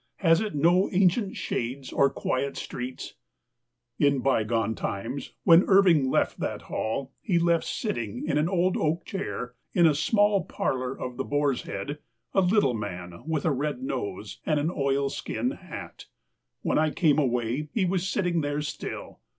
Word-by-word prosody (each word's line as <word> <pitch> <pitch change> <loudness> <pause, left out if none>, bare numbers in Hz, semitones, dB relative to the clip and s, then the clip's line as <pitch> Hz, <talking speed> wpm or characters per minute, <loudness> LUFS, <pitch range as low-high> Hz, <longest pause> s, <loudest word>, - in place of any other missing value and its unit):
Has 165 -1 +3
it 215 -6 -3
no 175 +6 +4
ancient 190 +2 +2
shades 130 +3 -3
or 140 - +4
quiet 135 +1 -2
streets? 125 +1 -6 0.9
In 140 -1 +4
bygone 115 -4 +1
times, 115 +6 -4
when 170 +2 +7
Irving 180 -9 +5
left - - +1
that - - -3
Hall, 130 +5 -3
he 185 -6 +1
left 170 -1 +3
sitting 120 - -3
in - - 0
an 155 +3 +1
old 185 0 +2
oak 160 +2 0
chair, 190 - -4 0.2
in 175 -3 +5
a 160 - +6
small 205 +5 +3
parlor 130 -3 -2
of 125 -1 -5
the 135 - -1
Boar's 145 -3 0
Head, 140 +10 -5 0.3
a 195 - +4
little 180 - +3
man 90 -5 -6
with 160 -3 -1
a 160 - +3
red 140 -1 -2
nose, 100 -6 -4
and 155 -2 +1
an 155 +4 0
oilskin 140 - -1
hat. 185 - -9 0.6
When - - +2
I 155 0 +3
came 155 -2 +3
away 125 +2 0
he 205 -5 +1
was 185 0 0
sitting 180 -4 +1
there 145 0 -1
still - - -6
145 Hz, 160 wpm, -27 LUFS, 125-175 Hz, 0.9 s, when